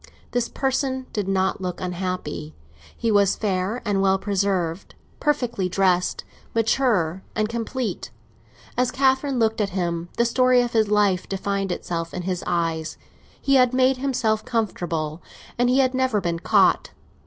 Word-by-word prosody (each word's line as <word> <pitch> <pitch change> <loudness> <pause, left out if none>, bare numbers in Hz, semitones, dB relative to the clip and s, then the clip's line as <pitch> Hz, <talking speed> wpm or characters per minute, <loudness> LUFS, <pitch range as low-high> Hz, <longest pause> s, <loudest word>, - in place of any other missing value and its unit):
This 245 -1 0
person 265 -1 -1
did 205 -3 -2
not 190 0 0
look 180 -1 -4
unhappy. 180 - -4 0.4
He 230 - 0
was 200 -2 +4
fair 195 +2 -1
and 200 -2 +1
well 195 0 +3
preserved, 195 -3 -1 0.2
perfectly 245 -10 0
dressed, 180 -1 +1 0.3
mature 220 -7 +1
and 215 -1 +1
complete. 230 - -3 0.7
As 250 0 +2
Catherine 265 0 +1
looked 225 -1 +1
at 200 - 0
him, 170 -1 -2
the 235 - +3
story 255 +1 +4
of 240 - -4
his 220 -2 +3
life 205 -3 +2
defined 195 0 -2
itself 165 -1 -4
in 180 - -4
his 180 -1 -2
eyes; 165 -2 -1 0.4
he 275 -1 +3
had 250 -1 +4
made 260 0 +4
himself 240 -5 0
comfortable, 175 -9 -2 0.4
and 245 0 +3
he 255 - +3
had 260 -1 +3
never 260 -4 +1
been 170 -3 -2
caught. - - +3
205 Hz, 150 wpm, -23 LUFS, 180-245 Hz, 0.7 s, was